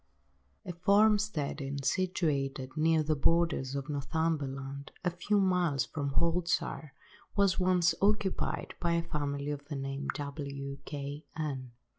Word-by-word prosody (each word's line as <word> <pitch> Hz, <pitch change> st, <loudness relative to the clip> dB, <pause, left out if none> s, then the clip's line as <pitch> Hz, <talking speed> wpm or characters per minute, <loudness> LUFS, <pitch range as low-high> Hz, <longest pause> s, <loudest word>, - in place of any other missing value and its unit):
A 180 Hz, -, -4 dB
farm–steading 175 Hz, -8 st, +2 dB
situated 140 Hz, -8 st, 0 dB
near 160 Hz, 0 st, +3 dB
the 155 Hz, +1 st, +1 dB
borders 150 Hz, -3 st, +2 dB
of 140 Hz, 0 st, -3 dB
Northumberland, 140 Hz, -2 st, -2 dB
a 180 Hz, -, +3 dB
few 200 Hz, +4 st, +1 dB
miles 175 Hz, -9 st, +2 dB
from 140 Hz, -1 st, -3 dB
Haltwhistle, 170 Hz, -2 st, +1 dB, 0.5 s
was 200 Hz, -2 st, +3 dB
once 180 Hz, -2 st, +4 dB
occupied 200 Hz, -1 st, +1 dB
by 170 Hz, -1 st, +1 dB
a 170 Hz, 0 st, +1 dB
family 145 Hz, -3 st, -2 dB
of 145 Hz, -1 st, -5 dB
the 145 Hz, -, -4 dB
name 135 Hz, +1 st, -3 dB
of -, -, -1 dB
W—— 140 Hz, -1 st, -5 dB
K—— 145 Hz, +1 st, -5 dB
n. 135 Hz, -6 st, -3 dB
150 Hz, 130 wpm, -31 LUFS, 140-175 Hz, 0.5 s, once